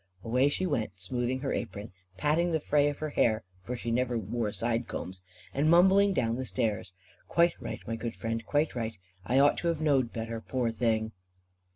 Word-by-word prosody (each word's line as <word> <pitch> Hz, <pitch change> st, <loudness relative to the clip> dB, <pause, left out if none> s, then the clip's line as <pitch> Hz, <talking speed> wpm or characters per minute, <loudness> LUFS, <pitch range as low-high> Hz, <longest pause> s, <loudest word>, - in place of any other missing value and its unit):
'" 95 Hz, -, -31 dB
Away 125 Hz, +4 st, +3 dB
she 185 Hz, +6 st, -1 dB
went, 115 Hz, -, -2 dB
smoothing 120 Hz, +6 st, -2 dB
her 135 Hz, -, -1 dB
apron, 105 Hz, -2 st, -4 dB, 0.3 s
patting 160 Hz, +4 st, +2 dB
the 160 Hz, -, +1 dB
fray 145 Hz, -1 st, +2 dB
of 145 Hz, -, -5 dB
her 155 Hz, -1 st, -4 dB
hair 110 Hz, -5 st, +2 dB, 0.2 s
for 125 Hz, +6 st, -4 dB
she 120 Hz, -1 st, -4 dB
never 125 Hz, 0 st, +1 dB
wore 110 Hz, +1 st, -2 dB
side 115 Hz, +2 st, -1 dB
combs 95 Hz, 0 st, -6 dB, 0.3 s
and 145 Hz, +3 st, +2 dB
mumbling 190 Hz, +4 st, +6 dB
down 115 Hz, -10 st, 0 dB
the 130 Hz, -, -3 dB
stairs. 110 Hz, -7 st, -2 dB, 0.3 s
"Quite 170 Hz, 0 st, +3 dB
right, -, -, -5 dB
my 115 Hz, -, -3 dB
good 115 Hz, 0 st, -4 dB
friend, 115 Hz, 0 st, -3 dB
quite 145 Hz, +7 st, +1 dB
right, 115 Hz, -3 st, -3 dB, 0.3 s
I 125 Hz, -, +2 dB
ought 140 Hz, +1 st, +5 dB
to 170 Hz, -, -2 dB
have 165 Hz, -2 st, 0 dB
knowed 135 Hz, -6 st, +2 dB
better, 115 Hz, 0 st, -4 dB
poor 125 Hz, -1 st, -1 dB
thing." 110 Hz, -1 st, 0 dB
120 Hz, 200 wpm, -29 LUFS, 115-145 Hz, 0.3 s, mumbling